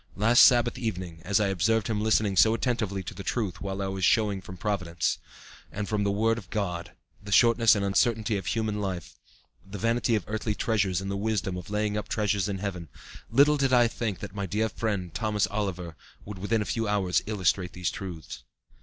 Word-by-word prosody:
Last 115 Hz, +4 st, +4 dB
Sabbath 120 Hz, -2 st, +5 dB
evening, 90 Hz, -7 st, -4 dB
as 100 Hz, +2 st, +2 dB
I 105 Hz, -2 st, +1 dB
observed 105 Hz, +4 st, +1 dB
him 105 Hz, -2 st, -1 dB
listening 110 Hz, -2 st, +2 dB
so 110 Hz, +4 st, +5 dB
attentively 110 Hz, -6 st, -1 dB
to -, -, -7 dB
the 100 Hz, -, -8 dB
truth 100 Hz, -3 st, -2 dB
while 100 Hz, 0 st, -3 dB
I -, -, -2 dB
was 95 Hz, -1 st, -4 dB
showing 105 Hz, -3 st, +2 dB
from 95 Hz, 0 st, -10 dB
Providence, 90 Hz, -4 st, -1 dB, 0.5 s
and 105 Hz, 0 st, -4 dB
from 105 Hz, -2 st, 0 dB
the 100 Hz, -, +1 dB
Word 115 Hz, +3 st, +1 dB
of 95 Hz, -6 st, -14 dB
God, 90 Hz, -6 st, -3 dB, 0.3 s
the 100 Hz, 0 st, -9 dB
shortness 115 Hz, +1 st, +5 dB
and 100 Hz, -1 st, -1 dB
uncertainty 110 Hz, +1 st, +1 dB
of 95 Hz, -3 st, -4 dB
human 110 Hz, -2 st, -1 dB
life, 95 Hz, -4 st, -4 dB, 0.5 s
the 95 Hz, +1 st, -8 dB
vanity 115 Hz, +2 st, +1 dB
of 105 Hz, -, -1 dB
earthly 105 Hz, 0 st, -2 dB
treasures 100 Hz, -5 st, 0 dB
and 95 Hz, 0 st, -4 dB
the -, -, -2 dB
wisdom 100 Hz, -2 st, -1 dB
of 90 Hz, +3 st, -7 dB
laying 105 Hz, 0 st, -1 dB
up 105 Hz, -, -4 dB
treasures 105 Hz, -2 st, 0 dB
in 100 Hz, -, -2 dB
heaven, 90 Hz, -5 st, -5 dB, 0.4 s
little 145 Hz, +5 st, +5 dB
did 135 Hz, -2 st, +1 dB
I 120 Hz, -1 st, +6 dB
think 115 Hz, -4 st, -4 dB
that 100 Hz, -1 st, -7 dB
my 100 Hz, -2 st, -3 dB
dear 110 Hz, +5 st, 0 dB
friend, 100 Hz, -8 st, -3 dB
Thomas 105 Hz, -2 st, 0 dB
Oliver, 90 Hz, -5 st, -3 dB, 0.3 s
would 100 Hz, -2 st, -8 dB
within 105 Hz, +3 st, 0 dB
a -, -, -10 dB
few 115 Hz, 0 st, -2 dB
hours 100 Hz, -3 st, +1 dB
illustrate 95 Hz, -4 st, 0 dB
these 90 Hz, -1 st, -2 dB
truths. 85 Hz, -9 st, -8 dB
105 Hz, 205 wpm, -27 LUFS, 95-110 Hz, 0.5 s, I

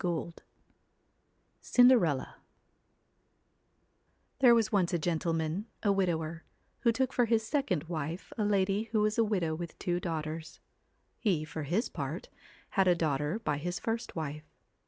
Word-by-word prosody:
21 175 Hz, -2 st, 0 dB
22 -, -, -18 dB, 1.2 s
CINDERELLA 240 Hz, -, +4 dB, 2.0 s
|HERE 245 Hz, -3 st, +7 dB
was 225 Hz, -2 st, +2 dB
once 190 Hz, -4 st, +2 dB
a -, -, +3 dB
gentleman, 165 Hz, +3 st, -1 dB, 0.2 s
a 205 Hz, -, +3 dB
CINDER -, -, -2 dB
widower, 165 Hz, -3 st, -1 dB, 0.4 s
who 235 Hz, -, +3 dB
took 260 Hz, +3 st, 0 dB
for 245 Hz, -, +3 dB
his 225 Hz, -1 st, +1 dB
second 225 Hz, -, 0 dB
ELLA 170 Hz, -, -11 dB
wife 160 Hz, +2 st, -4 dB
a 215 Hz, -, -1 dB
lady 200 Hz, +1 st, +1 dB
who 215 Hz, -, +3 dB
was 215 Hz, +1 st, +1 dB
a -, -, +6 dB
widow 185 Hz, -7 st, 0 dB
with 170 Hz, +1 st, -6 dB
two 175 Hz, -1 st, -1 dB
daughters. 160 Hz, -2 st, -4 dB, 0.6 s
He, 175 Hz, -9 st, +1 dB
for 155 Hz, +1 st, -6 dB
his 175 Hz, -, 0 dB
part, -, -, -5 dB, 0.4 s
had 195 Hz, -1 st, +2 dB
a 180 Hz, -, +5 dB
daughter 150 Hz, +1 st, 0 dB
by 150 Hz, -11 st, -2 dB
his 175 Hz, +3 st, -3 dB
first 230 Hz, +1 st, -3 dB
wife. 150 Hz, -1 st, -5 dB
175 Hz, 155 wpm, -31 LUFS, 160-220 Hz, 2.0 s, |HERE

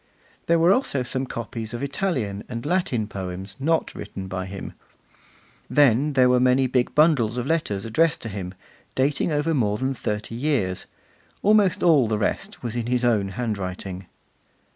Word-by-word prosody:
There 170 Hz, -, +4 dB
were 170 Hz, +3 st, +5 dB
also 170 Hz, -, +1 dB
some 130 Hz, +1 st, -2 dB
copies 115 Hz, 0 st, -5 dB
of 120 Hz, -, -5 dB
Italian 135 Hz, -, -2 dB
and 115 Hz, +3 st, -5 dB
Latin 150 Hz, -, 0 dB
poems 95 Hz, -1 st, -6 dB
not 160 Hz, +4 st, 0 dB
written 95 Hz, -1 st, -7 dB
by 95 Hz, 0 st, -4 dB
him. 95 Hz, 0 st, -7 dB, 1.0 s
Then 145 Hz, +1 st, +4 dB
there 130 Hz, -2 st, +5 dB
were 125 Hz, 0 st, +4 dB
many 130 Hz, +1 st, +4 dB
big 125 Hz, -1 st, 0 dB
bundles 140 Hz, -8 st, +3 dB
of 125 Hz, -, -2 dB
letters 135 Hz, -11 st, -1 dB
addressed 150 Hz, +9 st, +1 dB
to 115 Hz, -, -4 dB
him, 95 Hz, -2 st, -6 dB, 0.4 s
dating 140 Hz, +5 st, +1 dB
over 150 Hz, +2 st, +1 dB
more 105 Hz, -7 st, +1 dB
than 130 Hz, +3 st, -1 dB
thirty 105 Hz, -3 st, -4 dB
years. 115 Hz, -8 st, -1 dB, 0.6 s
Almost 205 Hz, -3 st, +4 dB
all 155 Hz, -9 st, +5 dB
the 110 Hz, -1 st, 0 dB
rest 105 Hz, -, -3 dB
was 120 Hz, -1 st, -3 dB
in 120 Hz, -1 st, -2 dB
his 125 Hz, 0 st, +1 dB
own 110 Hz, -5 st, +2 dB
handwriting. 95 Hz, -5 st, -4 dB
120 Hz, 165 wpm, -24 LUFS, 105-145 Hz, 1.0 s, were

